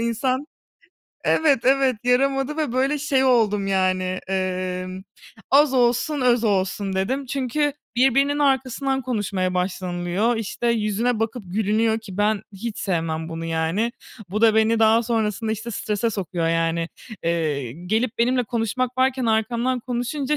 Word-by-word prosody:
insan 255 Hz, +4 st, -1 dB, 0.8 s
Evet, 290 Hz, -6 st, +3 dB
evet, 265 Hz, -2 st, +3 dB
yaramadı 270 Hz, +3 st, +1 dB
ve, 300 Hz, -6 st, -1 dB
böyle, 270 Hz, +3 st, +1 dB
şey 275 Hz, -3 st, +1 dB
oldum, 210 Hz, -6 st, +3 dB
yani, 185 Hz, -1 st, +1 dB, 0.3 s
emm, 185 Hz, 0 st, -3 dB, 0.5 s
"Az 280 Hz, 0 st, +5 dB
olsun, 245 Hz, +4 st, +2 dB
öz 245 Hz, -2 st, +3 dB
olsun," 195 Hz, -1 st, 0 dB
dedim. 255 Hz, +9 st, -1 dB
Çünkü 275 Hz, +3 st, 0 dB, 0.2 s
birbirinin 275 Hz, +3 st, +3 dB
arkasından 270 Hz, -1 st, +1 dB
konuşmaya 200 Hz, -6 st, -1 dB
başlanılıyor, 180 Hz, +4 st, -1 dB
işte, 225 Hz, +2 st, -3 dB
yüzüne 225 Hz, +1 st, 0 dB
bakıp 225 Hz, +1 st, -2 dB
gülünüyor 220 Hz, +3 st, +1 dB
ki 200 Hz, -4 st, -10 dB
ben 205 Hz, 0 st, +1 dB
hiç 215 Hz, +3 st, -6 dB
sevmem 165 Hz, -4 st, -2 dB
bunu 165 Hz, 0 st, -5 dB
yani. 165 Hz, +8 st, -1 dB, 0.4 s
Bu 215 Hz, +2 st, -2 dB
da 220 Hz, -1 st, +6 dB
beni 220 Hz, +1 st, +3 dB
daha 225 Hz, +1 st, +5 dB
sonrasında, 220 Hz, -1 st, -1 dB
işte, 220 Hz, +2 st, -5 dB
strese 215 Hz, +2 st, -1 dB
sokuyor 180 Hz, -4 st, -2 dB
yani, 165 Hz, 0 st, 0 dB, 0.3 s
eee, 155 Hz, -7 st, -1 dB
gelip 215 Hz, -, -2 dB
benimle 250 Hz, +1 st, +2 dB
konuşmak 240 Hz, +3 st, -2 dB
varken 260 Hz, -1 st, +2 dB
arkamdan 235 Hz, +3 st, 0 dB
konuşunca 255 Hz, +5 st, -2 dB
225 Hz, 135 wpm, -23 LUFS, 190-255 Hz, 0.8 s, da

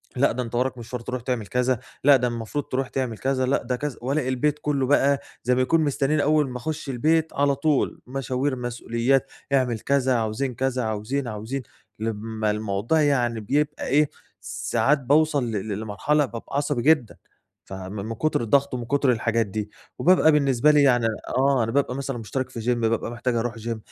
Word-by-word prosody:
لأ 140 Hz, +3 st, +3 dB
ده 125 Hz, +2 st, -2 dB
أنت 120 Hz, +1 st, -6 dB
وراك 125 Hz, +1 st, 0 dB
مشوار 120 Hz, +1 st, -6 dB
تروح 125 Hz, +1 st, -4 dB
تعمل 120 Hz, -4 st, -3 dB
كذا، 125 Hz, -1 st, +1 dB, 0.2 s
لأ 140 Hz, 0 st, +7 dB
ده 125 Hz, 0 st, 0 dB
المفروض 120 Hz, +4 st, -3 dB
تروح 130 Hz, 0 st, -2 dB
تعمل 125 Hz, -5 st, -2 dB
كذا، 130 Hz, -1 st, 0 dB
لأ 135 Hz, +2 st, +1 dB
ده 125 Hz, 0 st, -1 dB
كذا 145 Hz, -1 st, -4 dB
والاقي 135 Hz, +1 st, -1 dB
البيت 150 Hz, +3 st, 0 dB
كُلّه 140 Hz, -3 st, 0 dB
بقى 140 Hz, -1 st, +3 dB, 0.2 s
زي 125 Hz, +1 st, +2 dB
ما 130 Hz, -, +2 dB
يكون 160 Hz, +5 st, +3 dB
مستنّيين 145 Hz, 0 st, +1 dB
أول 150 Hz, -2 st, +2 dB
ما 125 Hz, -, -5 dB
أخُش 150 Hz, +2 st, -5 dB
البيت 155 Hz, +5 st, +1 dB
على 140 Hz, 0 st, +2 dB
طول 145 Hz, 0 st, 0 dB
مشاوير، 130 Hz, +1 st, -1 dB
مسؤوليات، 120 Hz, +2 st, 0 dB, 0.2 s
اعمل 125 Hz, -4 st, +2 dB
كذا، 130 Hz, -1 st, +1 dB
عاوزين 115 Hz, +3 st, -1 dB
كذا، 130 Hz, -1 st, -1 dB
عاوزين، 110 Hz, +5 st, -2 dB
عاوزين، 115 Hz, +5 st, -4 dB, 0.4 s
لمّا 110 Hz, 0 st, -2 dB
الموضوع 105 Hz, +8 st, 0 dB
يعني 120 Hz, -6 st, +1 dB
بيبقى 145 Hz, +7 st, -1 dB
إيه، 145 Hz, +2 st, +3 dB, 0.3 s
ساعات 105 Hz, +8 st, 0 dB
باوصل 145 Hz, +1 st, +2 dB
ل 105 Hz, 0 st, -3 dB
لمرحلة 140 Hz, +8 st, +1 dB
بابقى 120 Hz, +3 st, -6 dB
عصبي 145 Hz, -4 st, 0 dB
جدًا، 150 Hz, -6 st, +3 dB, 0.5 s
فم 95 Hz, 0 st, -7 dB
من 105 Hz, +2 st, -4 dB
كُتر 155 Hz, 0 st, 0 dB
الضَغَط 135 Hz, +4 st, +2 dB
ومن 120 Hz, -2 st, -3 dB
كُتر 140 Hz, 0 st, +2 dB
الحاجات 115 Hz, -1 st, +1 dB
دي. 105 Hz, +1 st, -4 dB, 0.3 s
وبابقى 175 Hz, -3 st, +5 dB
بالنسبة 140 Hz, -1 st, +4 dB
لي 145 Hz, -1 st, +5 dB
يعني 120 Hz, -4 st, +4 dB, 0.3 s
آه، 135 Hz, -2 st, +3 dB
أنا 115 Hz, -, -2 dB
بابقى 140 Hz, -2 st, +1 dB
مثلًا 135 Hz, -2 st, -3 dB
مُشترِك 130 Hz, +4 st, -3 dB
في 120 Hz, -3 st, -6 dB
gym، 120 Hz, +1 st, +1 dB
بابقى 115 Hz, 0 st, 0 dB
محتاج 120 Hz, 0 st, -2 dB
أروح 120 Hz, +1 st, -1 dB
gym، 115 Hz, 0 st, -3 dB
125 Hz, 185 wpm, -24 LUFS, 115-140 Hz, 0.5 s, لأ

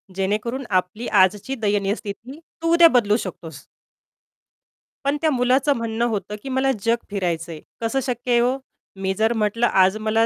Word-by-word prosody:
जेणेकरून 210 Hz, +7 st, -2 dB, 0.2 s
आपली 195 Hz, +6 st, -7 dB, 0.2 s
आजची 210 Hz, +8 st, -1 dB
दयनीय 205 Hz, -2 st, 0 dB
स्थिती 235 Hz, +8 st, -8 dB, 0.2 s
तू 330 Hz, 0 st, +1 dB
उद्या 340 Hz, 0 st, +8 dB
बदलू 210 Hz, -2 st, +3 dB
शकतोस. 165 Hz, -5 st, -9 dB, 1.4 s
पण 285 Hz, +1 st, +1 dB
त्या 315 Hz, -, +3 dB
मुलाचं 260 Hz, +3 st, +2 dB
म्हणणं 230 Hz, +1 st, -1 dB
होतं, 210 Hz, -1 st, -3 dB
की 270 Hz, -, -6 dB
"मला 265 Hz, +1 st, +1 dB
जग 230 Hz, +1 st, +3 dB
फिरायचं 175 Hz, -4 st, -2 dB
आहे." 155 Hz, -, -8 dB, 0.2 s
कसं 230 Hz, +4 st, 0 dB
शक्य 245 Hz, -1 st, -3 dB
आहे 240 Hz, -, +5 dB
हो? 250 Hz, +2 st, +2 dB, 0.4 s
मी 190 Hz, 0 st, 0 dB
जर 220 Hz, +2 st, +2 dB
म्हटलं 220 Hz, +2 st, 0 dB
आज 190 Hz, +2 st, +3 dB
मला 225 Hz, +1 st, +3 dB
225 Hz, 165 wpm, -22 LUFS, 200-255 Hz, 1.4 s, उद्या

